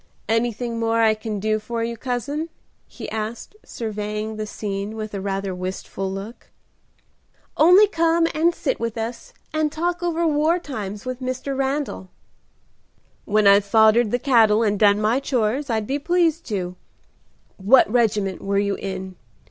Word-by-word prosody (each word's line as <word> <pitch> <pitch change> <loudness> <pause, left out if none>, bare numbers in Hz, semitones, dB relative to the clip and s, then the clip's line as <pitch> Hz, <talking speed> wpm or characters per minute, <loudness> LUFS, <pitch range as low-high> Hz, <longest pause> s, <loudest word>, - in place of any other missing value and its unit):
"Anything 230 +1 -1
more 230 0 +1
I 220 -1 +5
can 215 -1 -5
do 215 +1 0
for 230 +2 -4
you, 235 0 -3
cousin?" 260 +7 -3 0.4
he - - -9
asked, 220 - -5
surveying 215 -1 -4
the 215 0 -4
scene 205 0 -4
with 215 -1 -6
a 200 - -4
rather 195 -1 -2
wistful 185 +1 -5
look. 200 +5 -8 1.1
"Only 360 +6 +7
come 335 -4 +2
and 335 +2 +2
sit 275 - -2
with 230 0 -3
us 235 - -5 0.2
and 310 -1 0
talk 345 +2 -2
over 340 -1 0
war 310 +2 +2
times 215 - -6
with 255 0 -5
Mr. 255 +2 -3
Randal." 270 -7 -2 1.2
"When 215 0 +2
I've 200 0 +7
foddered 220 +2 +4
the 245 - +1
cattle 230 -4 +4
and 205 -2 0
done 205 -1 +5
my 220 +4 +2
chores 260 +1 -1
I'd 220 -2 0
be 275 +5 -2
pleased 335 0 +1
to. 180 -4 -3 0.8
What 220 +7 +5
regiment 210 -5 0
were 200 0 -1
you 200 0 +1
in?" 190 -1 -6
225 Hz, 155 wpm, -22 LUFS, 205-275 Hz, 1.2 s, Only